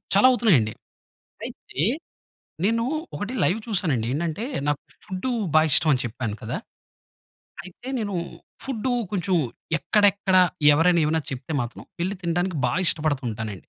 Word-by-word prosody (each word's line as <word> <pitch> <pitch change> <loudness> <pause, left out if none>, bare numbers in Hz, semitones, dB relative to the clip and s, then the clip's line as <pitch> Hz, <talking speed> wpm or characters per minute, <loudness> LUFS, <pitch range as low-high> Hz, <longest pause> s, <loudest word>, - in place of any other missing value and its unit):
చాలా 205 +6 +7
అవుతున్నాయండి. 160 - +3 0.7
అయితే 140 - -5 0.8
నేను 230 +2 +2 0.3
ఒకటి 205 +4 -4
లైవ్ 190 - +2
చూసానండి. 160 - 0
ఏంటంటే 165 +7 -2 0.2
నాకు 145 - +1 0.2
ఫుడ్దు 190 +5 -3 0.2
బా 155 - +8
ఇష్టం 160 +1 +5
అని 130 - +1
చెప్పాను 115 -2 -4
కదా! - - -3 1.1
అయితే 185 +8 -12
నేను 205 -3 -3 0.5
ఫుడ్దు 260 -1 -2 0.2
కొంచెం 190 -2 0 0.4
ఎక్కడెక్కడ, 200 +4 +3 0.4
ఎవరైనా 170 +3 +4
ఏమైనా 160 +1 +1
చెప్తే 130 +4 -5
మాత్రం, 120 0 -6 0.2
వెళ్లి 190 +2 -1
తినడానికి 175 +1 0
బా 120 - -1
ఇష్టపడుతుంటానండి. 125 -9 -1
170 Hz, 125 wpm, -24 LUFS, 140-205 Hz, 1.1 s, బా